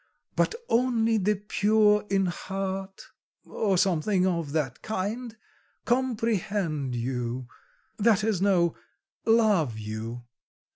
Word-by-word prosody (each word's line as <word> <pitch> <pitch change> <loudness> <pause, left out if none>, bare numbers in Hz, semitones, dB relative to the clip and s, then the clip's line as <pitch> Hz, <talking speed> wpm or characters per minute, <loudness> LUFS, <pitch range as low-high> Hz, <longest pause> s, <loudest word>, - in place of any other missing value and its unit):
but - - +1
only 230 -2 +2
the 210 +2 +2
pure 210 +1 +3
in 195 -1 +2
heart,' 195 +1 -4 0.4
or 200 -4 0
something 185 +1 +2
of 170 -5 -1
that 145 -5 -2
kind 220 +3 -4 0.5
'comprehend 210 - 0
you' 125 0 -3 0.5
that 215 -1 +4
is, 210 -4 0
no 180 -4 +3 0.5
'love 210 - +3
you. 110 +3 -6
195 Hz, 100 wpm, -27 LUFS, 155-220 Hz, 0.5 s, that